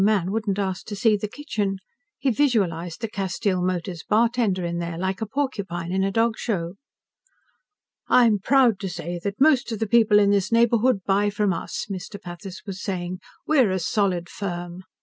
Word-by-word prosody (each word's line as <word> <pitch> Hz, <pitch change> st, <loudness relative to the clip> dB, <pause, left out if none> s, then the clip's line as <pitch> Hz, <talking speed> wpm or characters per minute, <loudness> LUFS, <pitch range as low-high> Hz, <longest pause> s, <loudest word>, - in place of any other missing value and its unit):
man 195 Hz, -3 st, +2 dB
wouldn't 210 Hz, -2 st, -1 dB
ask 190 Hz, -2 st, -3 dB
to 210 Hz, -, -5 dB
see 215 Hz, +1 st, +3 dB
the 210 Hz, +1 st, -3 dB
kitchen. 205 Hz, -6 st, -3 dB, 0.4 s
He 270 Hz, -, +1 dB
visualized 195 Hz, -, 0 dB
the 225 Hz, -, -1 dB
Castile 195 Hz, -1 st, -1 dB
Motors 180 Hz, -1 st, -2 dB
Bartender 220 Hz, -4 st, +1 dB
in 170 Hz, 0 st, -2 dB
there, 170 Hz, -1 st, -4 dB
like 190 Hz, +3 st, -2 dB
a 220 Hz, -, -2 dB
porcupine 200 Hz, -10 st, -3 dB
in 190 Hz, +1 st, +1 dB
a 195 Hz, -, +1 dB
dog 225 Hz, +2 st, +1 dB
show. 175 Hz, -7 st, -2 dB, 1.3 s
"I'm 230 Hz, -4 st, +5 dB
proud 245 Hz, -2 st, +3 dB
to 195 Hz, -, -4 dB
say 175 Hz, 0 st, -5 dB
that 200 Hz, 0 st, -3 dB
most 275 Hz, -4 st, +4 dB
of 225 Hz, -, -2 dB
the 220 Hz, -, -1 dB
people 220 Hz, -1 st, +4 dB
in 200 Hz, -1 st, +4 dB
this 200 Hz, 0 st, +1 dB
neighborhood 235 Hz, -2 st, +3 dB
buy 200 Hz, +1 st, +2 dB
from 205 Hz, -1 st, 0 dB
us," -, -, -4 dB
Mr. 200 Hz, +1 st, -6 dB
Pathis 180 Hz, 0 st, -9 dB
was 195 Hz, -2 st, -6 dB
saying. 185 Hz, -2 st, -3 dB, 0.3 s
"We're 270 Hz, -8 st, +4 dB
a 190 Hz, -, 0 dB
solid 180 Hz, -1 st, 0 dB
firm." 175 Hz, -2 st, -5 dB
200 Hz, 180 wpm, -24 LUFS, 185-225 Hz, 1.3 s, I'm